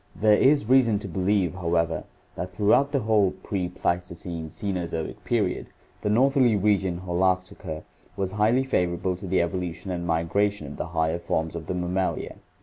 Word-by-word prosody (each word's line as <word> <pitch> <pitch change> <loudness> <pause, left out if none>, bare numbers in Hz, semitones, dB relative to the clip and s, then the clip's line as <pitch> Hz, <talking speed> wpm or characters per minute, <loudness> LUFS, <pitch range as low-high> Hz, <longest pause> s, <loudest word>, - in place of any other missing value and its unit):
There 105 0 +4
is 135 +4 +4
reason 125 -4 +5
to 100 - -6
believe, 95 -2 +1
however, 85 -2 0 0.3
that 90 0 -6
through 105 +2 +3
out 140 +1 +3
the 140 -2 +1
whole 105 -4 +2
pre 90 -3 -2
Pleistocene 85 -2 -3
Cenozoic 85 -2 -4
period - - 0 0.3
the 105 - -1
northerly 130 +1 +4
region 95 -3 +1
(Holarctica) 90 -3 -1 0.3
was 95 -1 -1
highly 110 +6 +3
favorable 90 -7 0
to 95 +2 -8
the 90 -1 +2
evolution 90 +1 -4
and 85 -1 -3
migration 85 +3 0
of 70 - -8
the - - -3
higher 80 +1 +1
forms 80 -1 -1
of 80 -2 -6
the 90 - -2
Mammalia. 90 +1 -2
90 Hz, 160 wpm, -26 LUFS, 85-105 Hz, 0.3 s, reason